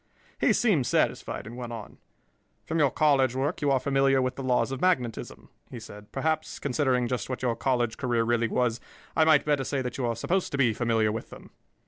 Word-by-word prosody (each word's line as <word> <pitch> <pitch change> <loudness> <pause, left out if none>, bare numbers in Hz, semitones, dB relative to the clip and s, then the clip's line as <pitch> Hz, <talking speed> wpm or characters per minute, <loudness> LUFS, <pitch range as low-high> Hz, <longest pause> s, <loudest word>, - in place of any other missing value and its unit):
He - - +3
seemed 175 - +2
satisfied, - - 0
and 115 +2 -9
went 120 -1 -6
on. 115 -3 -9 0.7
"From 165 +1 -1
your 145 -3 +4
college 135 -3 +2
work 145 +6 -1
you 145 - +1
are 135 -1 +3
familiar 135 -1 +2
with 130 0 -1
the - - -6
laws 130 0 +1
of 135 - -4
magnetism," 125 -12 -1 0.2
he 120 - -8
said. 105 -2 -12
"Perhaps, 155 +3 -2
considering 130 -3 0
just 125 -2 -3
what 130 0 -4
your 120 -2 +1
college 120 -3 0
career 120 -3 0
really 120 0 +1
was, 120 0 0 0.4
I 160 - +4
might 155 -3 +5
better 145 -2 +1
say 135 0 -2
that 125 +1 -5
you 125 - 0
are 115 - -1
supposed 180 - -1
to - - 0
be 125 -5 +3
familiar 115 -2 +1
with 110 +1 -5
them." - - -13
130 Hz, 210 wpm, -27 LUFS, 120-140 Hz, 0.7 s, might